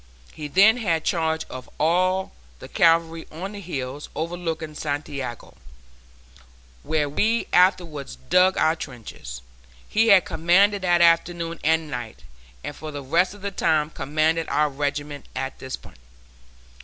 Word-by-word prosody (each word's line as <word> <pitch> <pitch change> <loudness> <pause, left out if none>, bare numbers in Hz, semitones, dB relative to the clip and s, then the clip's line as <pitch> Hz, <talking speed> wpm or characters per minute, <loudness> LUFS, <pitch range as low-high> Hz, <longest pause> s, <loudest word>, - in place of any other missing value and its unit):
He 150 - -6
then 200 +9 +5
had 170 -9 0
charge 160 -1 0
of 130 0 -9
all 185 +4 +2 0.3
the - - -11
cavalry 165 -1 +2
on 180 +6 -6
the 205 - -8
hills 140 -5 -5
overlooking 165 -1 -4
Santiago, 145 -5 -5 1.3
where 150 -1 0
we 220 +11 +1
afterwards 175 -6 +2
dug 180 +7 +3
our 160 - +3
trenches. 115 - -9 0.4
He 225 +1 +2
had 200 -5 +6
command 175 +6 +3
that 180 -3 +2
afternoon 170 0 +2
and 160 0 +2
night, 120 -4 -6 0.4
and 145 - -6
for 155 - -7
the 145 -2 -6
rest 175 +8 +1
of 205 - -15
the 200 - -2
time 155 -4 +1
commanded 155 +4 0
our 150 0 +2
regiment 145 +1 -4
at 135 0 -4
this 130 0 -5
point. - - -17
160 Hz, 140 wpm, -24 LUFS, 145-180 Hz, 1.3 s, had